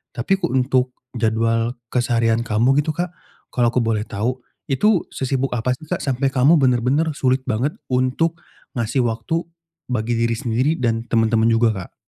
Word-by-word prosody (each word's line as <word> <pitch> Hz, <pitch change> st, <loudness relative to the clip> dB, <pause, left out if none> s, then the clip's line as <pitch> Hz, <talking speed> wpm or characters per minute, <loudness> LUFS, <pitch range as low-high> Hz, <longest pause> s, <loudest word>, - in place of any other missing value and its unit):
Tapi 190 Hz, +12 st, 0 dB
kuk -, -, 0 dB
untuk 130 Hz, -1 st, +1 dB, 0.2 s
jadwal 115 Hz, 0 st, 0 dB, 0.2 s
keseharian 115 Hz, -2 st, +2 dB
kamu 120 Hz, +5 st, +2 dB
gitu 155 Hz, -, -5 dB
Kak, 175 Hz, 0 st, -3 dB, 0.4 s
kalau 120 Hz, -1 st, +2 dB
aku 125 Hz, -, -4 dB
boleh 110 Hz, -2 st, 0 dB
tahu 120 Hz, +5 st, -2 dB, 0.3 s
itu 190 Hz, +8 st, +3 dB
sesibuk 135 Hz, 0 st, -1 dB
apa 125 Hz, +2 st, 0 dB
sih, -, -, -13 dB
Kak, 175 Hz, +3 st, -3 dB
sampai 135 Hz, 0 st, 0 dB
kamu 140 Hz, +6 st, +5 dB
bener-bener 135 Hz, +4 st, +2 dB
sulit 130 Hz, -1 st, +1 dB
banget 125 Hz, +7 st, -1 dB, 0.2 s
untuk 130 Hz, +7 st, +1 dB, 0.3 s
ngasih 120 Hz, +2 st, 0 dB
waktu 115 Hz, +9 st, -1 dB, 0.5 s
bagi 120 Hz, 0 st, 0 dB
diri 115 Hz, 0 st, +1 dB
sendiri 120 Hz, +5 st, 0 dB
dan 115 Hz, -1 st, 0 dB
temen-temen 115 Hz, -1 st, +2 dB
juga, 115 Hz, 0 st, +4 dB, 0.2 s
Kak? -, -, -20 dB
125 Hz, 160 wpm, -21 LUFS, 115-135 Hz, 0.5 s, kamu